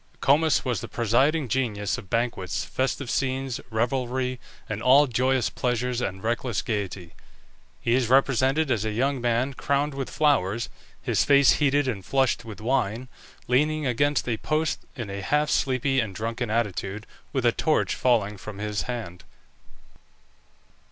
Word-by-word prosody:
Comus 155 +3 +3
was 125 -7 -1
the - - -6
presiding 130 +6 +1
genius 110 -6 -1
of 95 - -10
banquets, 115 -6 -1
festive 130 +1 -2
scenes, 130 -2 -1
revelry, 125 +2 -1 0.3
and 105 0 -4
all 135 +4 +6
joyous 130 0 +1
pleasures 125 0 -1
and 95 -3 -4
reckless 120 0 -1
gaiety. 95 -5 -4 0.7
He 115 - 0
is 125 -2 +2
represented 135 +2 +3
as 110 -4 +1
a 110 - -1
young 135 +3 0
man 120 +3 0
crowned 140 +2 0
with 135 -1 -4
flowers, 115 -8 +1 0.3
his - - +2
face 140 -1 +6
heated 145 -1 +2
and 105 -7 -3
flushed 135 +2 +1
with 110 -3 -9
wine, 120 0 -1 0.4
leaning 150 +4 +2
against 140 +3 +1
a 115 -2 0
post 155 +7 -1 0.2
in 115 -7 -5
a 100 0 -5
half 150 +7 +1
sleepy 135 +1 +1
and 105 -6 -2
drunken 115 +2 -3
attitude, 105 -2 -2 0.3
with 130 -3 -1
a 120 - +5
torch 155 +6 +1
falling 105 -5 +1
from 100 +2 -9
his 105 0 -2
hand. 90 -8 -5
125 Hz, 150 wpm, -25 LUFS, 110-135 Hz, 0.7 s, all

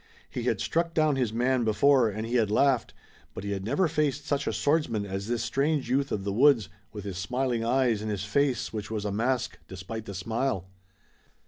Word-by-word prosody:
He - - -3
had - - +1
struck 170 0 -1
down 155 -2 +3
his 125 -5 0
man 125 +2 +1
before 125 +2 +4
and 110 +2 -4
he 115 - -5
had 115 -4 +3
laughed, 130 +3 +2 0.4
but - - -6
he 100 - -3
had 95 -1 -3
never 175 - +1
faced 150 -2 0
such 145 -1 -1
a - - +2
swordsman 145 -9 +1
as 95 +1 -4
this 120 0 -1
strange 140 0 0
youth 140 +2 +1
of 100 - -2
the 100 0 -2
woods, 120 - +4 0.2
with 105 -2 -7
his 95 -3 -5
smiling 125 +2 -1
eyes 120 -2 +2
and 110 - -3
his 105 -1 -2
face 135 +3 0
which 105 -2 -4
was 110 -2 -3
a 105 - -1
mask 120 +4 -1
despite 95 +4 -7
the 100 - -7
smile. 110 0 -1
120 Hz, 210 wpm, -28 LUFS, 105-140 Hz, 0.4 s, before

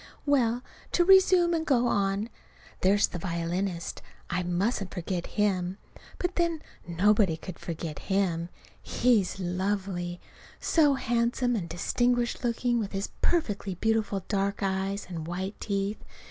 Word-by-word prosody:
Well, 250 -4 +2 0.3
to 350 - +4
resume 370 -2 +6
and 325 -1 +1
go 250 -6 +3
on. 200 -1 +1 0.5
There's 200 +2 +4
the 175 - -6
violinist. 170 +1 -2 0.3
I 180 - +1
mustn't 185 +3 -1
forget 175 -1 -3
him. 190 -3 +1 0.4
But, 360 0 -2
then, 335 -3 +1 0.2
nobody 190 0 +3
could 180 +1 -9
forget 160 -2 -5
him. 180 -4 0 0.3
He's 220 -7 +2
lovely: 180 -1 -2 0.4
so 295 -4 +4
handsome 240 0 +1
and 175 -6 -3
distinguished 245 +9 0
looking 240 0 +1
with 210 -2 -3
his 195 +1 -2
perfectly 205 - 0
beautiful 215 -1 0
dark 200 -1 0
eyes 195 +1 -1
and 165 -3 -6
white 190 +4 -4
teeth. 200 0 -2
200 Hz, 130 wpm, -28 LUFS, 180-240 Hz, 0.5 s, resume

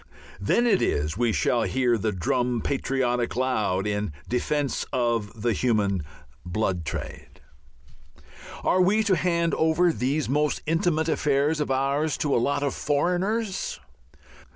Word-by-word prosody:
Then 105 - +2
it 205 -6 +3
is 75 +3 0
we 120 +1 +1
shall 105 - +1
hear 125 -1 +1
the 110 0 -1
drum 120 +6 0
patriotic 125 -3 -1
loud 110 -7 0
in 105 -5 -2
defence 140 +3 -1
of 115 -3 -1
the 120 -2 +2
human 100 -5 +1 0.4
blood 90 -2 -2
trade. - - -7 1.2
Are 185 - +3
we 210 +4 +3
to 200 -3 +3
hand 170 0 +1
over 160 +2 +2
these 135 +7 -1
most 150 +3 0
intimate 165 -1 +1
affairs 150 0 +1
of 150 - -1
ours 140 +3 0
to 145 - 0
"a - - +3
lot 140 +3 0
of 140 - 0
foreigners"? 190 - -1
135 Hz, 135 wpm, -25 LUFS, 110-160 Hz, 1.2 s, it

